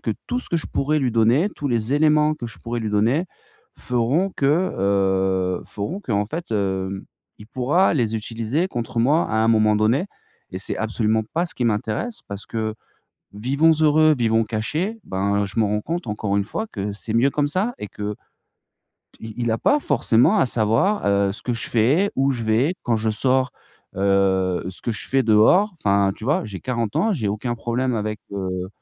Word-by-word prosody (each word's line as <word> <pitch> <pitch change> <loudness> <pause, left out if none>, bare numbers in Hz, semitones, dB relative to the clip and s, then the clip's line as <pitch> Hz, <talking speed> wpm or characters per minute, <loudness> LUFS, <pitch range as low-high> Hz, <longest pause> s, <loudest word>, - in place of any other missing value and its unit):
que - - -2 0.2
tout 245 0 -1
ce - - -7
que 170 - +2
je - - -6
pourrais 150 +3 0
lui 130 -3 0
donner, 120 - +3
tous 145 - -3
les 115 +2 0
éléments 150 0 +3
que 120 -5 -7
je 115 - -11
pourrais 120 0 -4
lui 110 -1 -3
donner 115 - +2 0.5
feront 125 +11 0
que, 135 - +1 0.3
heu, 95 -2 +1
feront 150 - -5
qu'en 105 - -1
fait, 165 -2 -5
heu, 95 -1 -2 0.3
il 105 - -12
pourra 145 - +2
les 115 -6 0
utiliser 115 - -2
contre 120 -3 -4
moi 145 +8 +3
à 110 - 0
un 110 +1 +2
moment 110 -1 +4
donné. 115 - +2 0.4
Et 95 - -5
c'est 95 - -3
absolument 110 0 0
pas 170 +2 +1
ce - - -5
qui 125 - -2
m'intéresse 115 - -2
parce 100 0 -7
que: 110 -1 -3 0.6
«Vivons 140 +9 +3
heureux, 155 0 +5
vivons 115 -1 +2
cachés». 155 - -2
Ben, 100 +2 0
je 100 - -6
m'en 110 - +3
rends 105 +1 0
compte, 170 -2 -4
encore 105 -1 -1
une 100 - +1
fois, 220 - -4
que 100 -1 -4
c'est 110 +2 -6
mieux 125 +4 +4
comme 145 0 0
ça 205 +10 -1
et 105 - -6 1.1
qu'il 115 +2 -6
a - - +1
pas 290 0 +2
forcément 160 - +3
à - - +4
savoir, 115 - +1
heu, 100 -1 +2
ce - - -8
que 125 - -2
je 115 - -5
fais, 140 - +3
où 135 +1 +2
je 115 -3 -4
vais 120 +11 +2
quand 115 -2 +1
je 110 0 -1
sors, 130 +3 +1 0.5
heu, 95 -2 +1
ce 95 - -8
que 115 - -1
je 95 -4 -6
fais 135 0 +2
dehors. 115 - +5
Enfin, 100 - +2
tu 110 - -9
vois, 140 -1 +1
j'ai 100 -4 -7
40 115 -4 -2
ans, 220 0 +2
j'ai 110 -9 -2
aucun 115 +4 -2
problème 125 +2 -1
avec, 105 -2 -3
heu, 95 -2 -3
115 Hz, 195 wpm, -22 LUFS, 105-145 Hz, 1.1 s, heureux